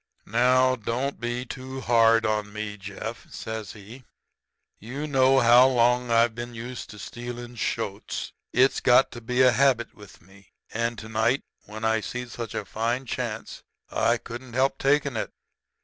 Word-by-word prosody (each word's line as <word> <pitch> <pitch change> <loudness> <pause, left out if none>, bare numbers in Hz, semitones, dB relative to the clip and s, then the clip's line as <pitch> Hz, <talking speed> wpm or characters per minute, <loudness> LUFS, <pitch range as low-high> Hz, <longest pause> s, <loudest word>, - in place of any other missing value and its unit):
"'Now, 130 +3 +3
don't 125 +4 -3
be 120 +1 -3
too 130 +1 -7
hard 115 -2 +4
on 105 -1 -1
me, 105 0 -5
Jeff,' 105 +3 -7
says 110 -2 -6
he. 110 +5 -12 0.8
'You 130 +8 -5
know 135 -2 +4
how 120 +2 +7
long 125 -1 +2
I've 115 0 +4
been 120 +1 -7
used 120 +2 -7
to 105 - -10
stealing 120 +3 -7
shoats. 115 - -3 0.2
It's 130 +3 +3
got 125 -1 +5
to 120 - -9
be 125 +2 +2
a 125 - +7
habit 125 -3 +2
with 105 -2 -15
me. 95 +3 -21 0.2
And 115 +1 -1
to 110 - -8
night, 110 +4 +1 0.2
when 110 +2 -6
I 110 0 +2
see 125 +5 -5
such 120 -3 -7
a 105 - -3
fine 115 +6 -2
chance, 115 -3 -5 0.3
I 120 +1 +2
couldn't 120 +2 -9
help 135 +2 +1
takin' 140 -1 +2
it.' - - -2
120 Hz, 165 wpm, -26 LUFS, 110-125 Hz, 0.8 s, how